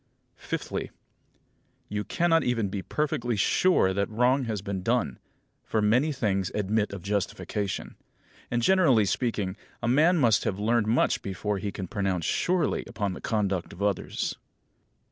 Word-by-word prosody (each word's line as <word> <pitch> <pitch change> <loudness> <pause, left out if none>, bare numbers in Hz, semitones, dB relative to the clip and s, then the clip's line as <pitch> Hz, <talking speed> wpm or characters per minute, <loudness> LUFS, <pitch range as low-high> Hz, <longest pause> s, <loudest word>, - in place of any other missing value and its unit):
Fifthly: - - -4 1.0
You 105 0 -3
cannot 165 +2 +2
even 115 -5 0
be 95 0 -3
perfectly 120 -3 -1
sure 105 - +3
that 100 +1 0
wrong 125 +4 +2
has 105 -4 -3
been 100 -2 -3
done, 115 - 0 0.4
for 110 - -1
many 120 +9 +3
things 100 - -1
admit 105 +1 0
of 100 -3 -7
justification. 100 0 -2 0.6
And, 120 0 0
generally 160 - +5
speaking, 105 -3 -1 0.2
a - - -3
man 155 +8 +4
must 115 -8 +4
have 95 - -1
learned 110 +1 +1
much 115 +3 +2
before 100 +1 -3
he 100 0 -3
can 95 -1 -5
pronounce 95 -3 -1
surely 180 -3 +1
upon 100 -3 -2
the - - -8
conduct 100 -5 -1
of 100 - -5
others. 100 -3 -1
105 Hz, 145 wpm, -27 LUFS, 100-125 Hz, 1.0 s, generally